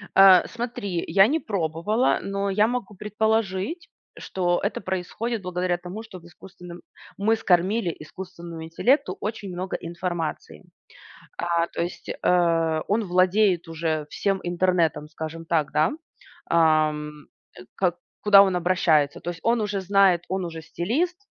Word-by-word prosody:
Э, 190 -2 +8
смотри, 230 -7 -4
я 195 +1 +5
не 310 +6 +1
пробовала, 200 - 0
но 200 0 -2
я 210 +2 +3
могу 240 -4 -4
предположить, 210 - -1 0.3
что 175 -2 -1
это 200 - -1
происходит 195 +5 -3
благодаря 180 -1 -1
тому, 180 +5 -8
что 205 -5 -11
в 170 - -20
искусственном 175 0 -12 0.4
мы 215 +3 +2
скормили 185 -2 +1
искусственному 170 0 -9
интеллекту 250 - +1
очень 210 -2 -4
много 180 +1 -4
информации. 175 -1 -5 0.7
А, 170 -1 0
то - - -5
есть, 175 +1 -5
э, 165 -3 +1
он 215 +3 +1
владеет 185 0 +2
уже 160 -2 -2
всем 195 -1 -1
интернетом, 175 -4 +1
скажем 160 +1 -7
так, 165 -4 0
да, 155 +10 +2 0.6
ам, 155 -2 +2 0.6
ка 180 -3 +1 0.3
куда 200 -1 +8
он 190 -2 0
обращается. 170 -5 +2
То 175 - -4
есть 170 - -10
он 230 0 +2
уже 205 -2 -2
знает, 190 -2 +3
он 190 0 -2
уже 165 -1 -7
стилист, 250 - -2
180 Hz, 140 wpm, -24 LUFS, 170-205 Hz, 0.7 s, Э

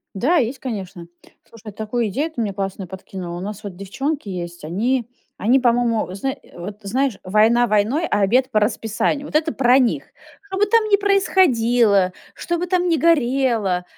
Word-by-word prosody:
Да, 285 - +2
есть, 260 0 0
конечно. 195 -8 -6 0.4
Слушай, 220 -2 -12
такую 220 +2 -2
идею 290 - -2
ты 255 - -8
мне 205 -3 -2
классную 195 -1 -4
подкинула. 185 -1 -7
У - - -6
нас 210 +2 -6
вот 195 -3 -6
девчонки 265 - -4
есть, 175 -3 -6
они 230 +9 -1 0.3
они, 245 +6 +3
по-моему, 235 -5 +1
зна 265 +8 -2
э, - - -14
вот 195 +4 -7
знаешь: 255 +3 -1
"Война 220 +5 +3
войной, 220 +10 +1
а - - 0
обед 250 +7 +3
по 215 - +2
расписанию". 225 +6 -1
Вот - - -9
это 320 +1 +2
про 255 0 +4
них. 250 -3 +1 0.4
Что 395 -1 -8
бы 415 - +4
там 455 +1 +3
ни 405 - +5
происходило, 245 - +3 0.2
что 345 -1 -3
бы 350 - -2
там 360 0 +1
ни 330 - +3
горело, 250 - +2
230 Hz, 180 wpm, -21 LUFS, 200-275 Hz, 0.4 s, ни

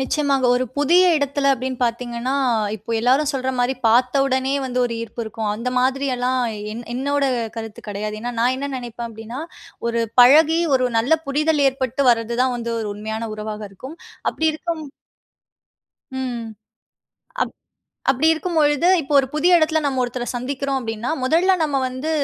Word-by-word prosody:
நிச்சயமாங்க. 275 -1 +1
ஒரு 255 - 0
புதிய 345 +6 +5
இடத்தில 280 -1 0
அப்பிடின்னு 260 0 -4
பார்த்தீங்கன்னா, 240 +2 -2 0.4
இப்ப 220 +3 -5
எல்லாரும் 270 +5 +3
சொல்றமாரி 260 -1 -1
பார்த்த 250 +4 +3
உடனே 265 0 0
வந்து 250 0 -3
ஒரு 235 - -2
ஈர்ப்பு 230 +1 -6
இருக்கும். 220 -1 -3
அந்த 235 +4 -3
மாதிரி 270 +2 +1
எல்லாம் 255 +1 0 0.3
என் 235 +2 -7
என்னோட 285 +3 0 0.3
கருத்து 225 -1 -7
கிடையாது. 210 +1 -4
ஏன்னா, 245 +1 -4
நான் 250 +2 +3
என்ன 280 +1 -4
நினைப்பேன் 240 -1 -6
அப்பிடின்னா, 225 +3 -8 0.5
ஒரு 235 0 0 0.2
பழகி 315 +6 +6 0.2
ஒரு 255 -1 +1
நல்ல 270 +8 +3
புரிதல் 300 +1 +2
ஏற்பட்டு 260 0 -2
வர்றதுதான் 235 +2 +1
வந்து 235 0 -4
ஒரு 215 - -3
உண்மையான 220 +2 -4
உறவாக 215 0 -5
இருக்கும். 260 - -10 0.3
அப்பிடி 320 0 +1
இருக்கும் 320 -1 -4 1.4
ம். 245 -3 -4 1.0
அப் - - -1 0.6
அப்பிடி 270 +4 +3
இருக்கும்பொழுது 320 -2 +1
இப்ப 275 - -9
ஒரு 265 - 0
புதிய 315 +4 +2
இடத்தில 315 0 +2
நம்ம 270 -3 0
ஒருத்தர 245 0 -3
சந்திக்கிறோம் 270 +2 -2
அப்பிடின்னா, 225 +1 -3
முதல்ல 330 +9 +3
நம்ம 290 -3 +1
வந்து 260 +5 -4
255 Hz, 150 wpm, -21 LUFS, 235-285 Hz, 1.4 s, பழகி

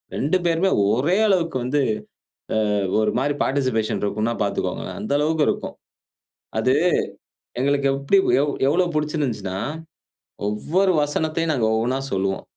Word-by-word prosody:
2 150 +7 +1
பேருமே 170 +3 +2 0.2
ஒரே 150 - +1
அளவுக்கு 175 -7 +1
வந்து, 140 +4 +1 0.9
ஆ - - +1 0.3
ஒரு 110 - +2
மாரி 145 +3 0
பார்ட்டிசிபேஷன் 130 -6 0
இருக்குன்னா, 110 +3 -1
பார்த்துக்கோங்க. 100 - -2 0.2
அந்தளவுக்கு 150 +6 +1
இருக்கும். - - -3 0.8
அது 130 +4 +2 0.9
எங்களுக்கு 140 +1 +1
எப்படி 140 +8 +2 0.2
எவ் 145 0 0 0.2
எவ்வளோ 175 +5 +2
பிடிச்சிருந்ததுன்னா, 135 - -2 0.9
ஒவ்வொரு 180 - +1
வசனத்தையும், 160 +2 -1
நாங்க 120 -6 +1
ஒவ்வொன்னா 120 +4 0
சொல்லுவோம். 95 0 -1
140 Hz, 115 wpm, -22 LUFS, 115-160 Hz, 0.9 s, பேருமே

